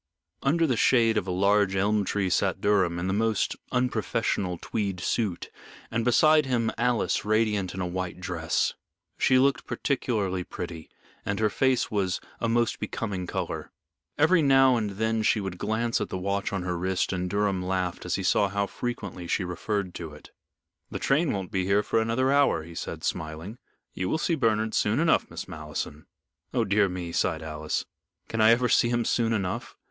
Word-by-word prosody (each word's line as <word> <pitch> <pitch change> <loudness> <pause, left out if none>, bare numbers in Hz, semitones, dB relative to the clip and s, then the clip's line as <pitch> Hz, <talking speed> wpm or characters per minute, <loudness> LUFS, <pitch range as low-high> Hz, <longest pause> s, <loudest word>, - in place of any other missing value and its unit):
Under 165 +4 +2
the 130 -6 +1
shade 115 -2 +4
of 105 -3 -1
a - - -1
large 100 +1 +2
elm 105 +2 +2
tree 95 -1 -1
sat - - +1
Durham, 95 -4 +2
in 85 - -2
the 95 - 0
most 110 0 +1 0.2
unprofessional 115 -7 0
tweed 100 -4 -3
suit, 95 -1 -2 0.4
and 115 0 0
beside 155 +4 +4
him, 115 -3 +1
Alice, 120 -1 +1
radiant 105 -4 +1
in 95 - -3
a - - -1
white 90 0 -4
dress. 85 -3 -1 0.5
She 130 - +4
looked 135 0 +2
particularly 105 -9 -1
pretty, 85 -3 -7 0.3
and 100 +1 -2
her 110 -1 +2
face 130 +2 +1
was 95 -4 0 0.2
a 115 - 0
most 120 0 +1
becoming 95 -5 -4
color. - - -4 0.5
Every 160 +3 +4
now 135 -2 +5
and 110 -3 -1
then 110 0 +1
she 110 0 +2
would 95 -3 -5
glance 115 +2 0
at - - -2
the - - -3
watch 100 +2 -2
on 100 -3 -2
her 90 -1 -2
wrist, 95 +1 0
and 90 0 -2
Durham 100 -2 0
laughed 90 -1 -2
as 90 - -1
he 95 - -3
saw 100 +2 +3
how 100 +1 0
frequently 100 -6 -5
she 95 - 0
referred 90 +1 -3
to 80 -3 -7
it. 75 - -15 0.6
"The - - -4
train 150 +2 +2
won't 95 -1 -4
be 95 -3 0
here 100 +2 +3
for 115 - +1
another 125 +4 +1
hour," 140 - +3
he 85 +1 -11
said, - - -6
smiling. 80 +8 -4 0.3
"You 90 0 -2
will - - +1
see 165 - 0
Bernard 110 -6 +1
soon 110 +5 +2
enough, 165 0 +2
Miss 85 +1 -7
Malleson." 75 -3 -6 0.5
"Oh, 120 -2 +2
dear 100 0 +3
me," 90 -2 -5
sighed 80 -1 0
Alice, 75 -1 -3 0.4
"can 115 - -1
I 110 - +7
ever 120 +2 +4
see 120 - +3
him 120 -1 0
soon 115 -1 +1
enough? 95 -5 -2
100 Hz, 185 wpm, -27 LUFS, 90-115 Hz, 0.6 s, I